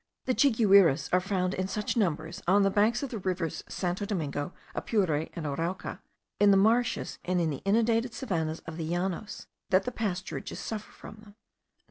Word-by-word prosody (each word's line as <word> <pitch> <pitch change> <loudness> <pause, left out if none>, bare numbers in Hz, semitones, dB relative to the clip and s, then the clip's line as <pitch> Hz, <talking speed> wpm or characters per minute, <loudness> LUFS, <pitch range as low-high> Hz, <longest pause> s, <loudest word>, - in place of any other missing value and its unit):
The 255 - +1
chiguires 200 - +5
are 180 - +6
found 185 -1 -1
in 185 0 -2
such 210 +4 -2
numbers 165 -7 -1
on 200 +3 +5
the 195 - +3
banks 220 +6 +2
of 275 - -4
the 225 - -4
rivers 180 -4 -2
Santo 180 +2 -2
Domingo, 160 -6 -2 0.2
Apure, 165 -8 0
and 170 -3 -5
Arauca, 165 +6 -3 0.4
in 205 - +6
the 195 - +6
marshes 225 +4 +2
and 180 0 0
in 165 -2 +1
the 140 - -5
inundated 230 +3 +2
savannahs* 165 - -2
of 165 -1 -7
the 160 -1 -3
Llanos, 185 +4 -3 0.2
that 185 +1 +4
the 250 - -3
pasturages 200 -3 -4
suffer 215 -2 -5
from 210 - -12
them. 210 -1 -16
190 Hz, 175 wpm, -29 LUFS, 170-215 Hz, 0.4 s, are